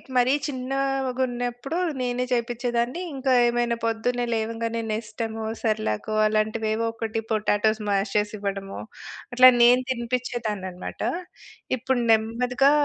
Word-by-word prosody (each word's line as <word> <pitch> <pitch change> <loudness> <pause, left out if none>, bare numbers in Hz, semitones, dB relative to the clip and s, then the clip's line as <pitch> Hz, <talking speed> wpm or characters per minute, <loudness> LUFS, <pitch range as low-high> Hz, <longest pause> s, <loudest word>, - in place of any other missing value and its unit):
మరీ 250 +2 +4
చిన్నాగున్నప్పుడు 260 0 -2 0.2
నేనే 250 0 -1
చేపిచ్చేదాన్ని, 240 +4 -1
ఇంకా 265 0 0 0.2
ఏమైనా 240 0 +1
పొద్దున్నే 240 +2 0
లేవంగానే 230 +1 -2
నెస్టమో, 220 0 -4 0.2
సెర్‌లాకో 215 - -1
అలాంటివేవోకటి, 220 +1 -1
పొటాటోస్ 215 0 +1
మాష్ 195 0 0
చేసివ్వడమో, 200 -2 -3 0.5
అట్లా 255 +1 +9
నేను 250 +2 +6
తినిపిచ్చేదాన్ననమాట. 235 -6 -3 0.8
ఇప్పుడు 255 +1 0
నెమ్మదిగా 245 +5 +3
235 Hz, 90 wpm, -25 LUFS, 220-250 Hz, 0.8 s, అట్లా